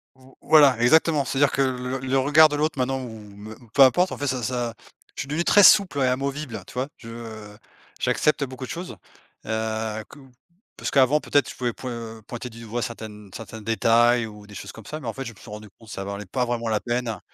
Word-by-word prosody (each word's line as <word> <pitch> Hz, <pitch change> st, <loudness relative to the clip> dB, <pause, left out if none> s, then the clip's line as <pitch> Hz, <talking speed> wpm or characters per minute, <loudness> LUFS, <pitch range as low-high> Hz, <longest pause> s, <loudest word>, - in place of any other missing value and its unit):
V 130 Hz, -, -24 dB, 0.2 s
voilà 145 Hz, -5 st, +6 dB
exactement, 155 Hz, +3 st, +4 dB
c'est-à-dire 140 Hz, +1 st, +2 dB
que 140 Hz, -, 0 dB
le 130 Hz, 0 st, -1 dB
le 130 Hz, -, -7 dB
le 135 Hz, +1 st, +2 dB
regard 150 Hz, +4 st, +6 dB
de 150 Hz, -, -2 dB
l'autre 150 Hz, 0 st, -1 dB
maintenant 135 Hz, +1 st, 0 dB
ou 125 Hz, -, -6 dB
ou 105 Hz, -2 st, -12 dB
me 105 Hz, +2 st, -10 dB, 0.2 s
peu 140 Hz, -, +7 dB
importe 180 Hz, +8 st, +4 dB
en -, -, -5 dB
fait 145 Hz, -, -3 dB
ça 130 Hz, -2 st, -1 dB
ça, 120 Hz, 0 st, -2 dB, 0.4 s
je -, -, -4 dB
suis -, -, -6 dB
devenu 150 Hz, +4 st, -1 dB
très 205 Hz, +3 st, +6 dB
souple 190 Hz, -7 st, +6 dB
et 130 Hz, -, +3 dB
amovible, 135 Hz, 0 st, -2 dB
heu, -, -, -4 dB
tu -, -, -14 dB
vois? 130 Hz, +2 st, -2 dB
Je, 115 Hz, -, -12 dB
heu, 110 Hz, -3 st, -9 dB, 0.4 s
j'accepte 150 Hz, -1 st, +1 dB
beaucoup 130 Hz, 0 st, -8 dB
de -, -, -12 dB
choses. 170 Hz, -, -6 dB, 0.5 s
Heu, 110 Hz, 0 st, -2 dB
que -, -, -14 dB, 0.6 s
parce -, -, -4 dB
qu'avant 140 Hz, +2 st, +4 dB
peut-être 145 Hz, -3 st, +1 dB
je -, -, -8 dB
pouvais 120 Hz, -2 st, -2 dB
point 115 Hz, -3 st, -7 dB
pointer 120 Hz, 0 st, -6 dB
du 115 Hz, 0 st, -12 dB
doigt 115 Hz, +2 st, -4 dB
certaines 105 Hz, -3 st, -7 dB
certains 110 Hz, 0 st, -8 dB
détails 115 Hz, +2 st, +3 dB
ou 105 Hz, -1 st, -12 dB
des 105 Hz, -, -13 dB
choses -, -, -7 dB
comme 110 Hz, -, -13 dB
ça, 155 Hz, -, -6 dB
mais 135 Hz, -, -8 dB
en 115 Hz, -, -2 dB
fait 135 Hz, -, -6 dB
je 115 Hz, -, -7 dB
me 105 Hz, -, -20 dB
suis -, -, -13 dB
rendu 105 Hz, 0 st, -9 dB
compte 115 Hz, -2 st, -16 dB
ça 95 Hz, -, -5 dB
en -, -, -8 dB
valait 100 Hz, +1 st, -5 dB
pas 125 Hz, +7 st, -1 dB
vraiment 120 Hz, -1 st, -2 dB
la 110 Hz, -1 st, +1 dB
peine 120 Hz, -1 st, -3 dB
120 Hz, 245 wpm, -24 LUFS, 110-135 Hz, 0.6 s, peu